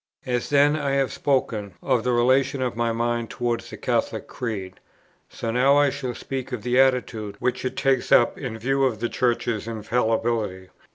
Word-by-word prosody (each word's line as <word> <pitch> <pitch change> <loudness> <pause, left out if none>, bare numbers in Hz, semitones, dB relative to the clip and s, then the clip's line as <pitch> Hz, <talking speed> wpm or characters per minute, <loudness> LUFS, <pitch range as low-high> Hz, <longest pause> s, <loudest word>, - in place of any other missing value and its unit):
As 125 -2 -1
then 145 +1 +4
I 145 -3 -1
have 135 -1 +2
above - - -8
spoken 110 -8 -1
of 125 -4 +1
the 125 - +1
relation 130 +3 +2
of 125 -2 -2
my 115 0 0
mind 115 0 -1
towards 120 -1 -2
the - - -8
Catholic - - -1
Creed, 100 -6 -5 0.5
so 115 - -4
now 135 +4 +4
I 145 -1 +4
shall 125 -3 -4
speak 135 -1 -5
of 120 -5 -4
the 125 +1 +2
attitude 125 -6 +1
which 125 - -1
it 130 0 -3
takes 135 -2 +1
up 120 - +5
in 125 -5 -5
the - - -9
view 135 +4 +1
of 120 -6 +1
the 120 +1 -1
Church's 120 -3 -1
infallibility. 110 -3 -1
120 Hz, 190 wpm, -24 LUFS, 115-130 Hz, 0.5 s, up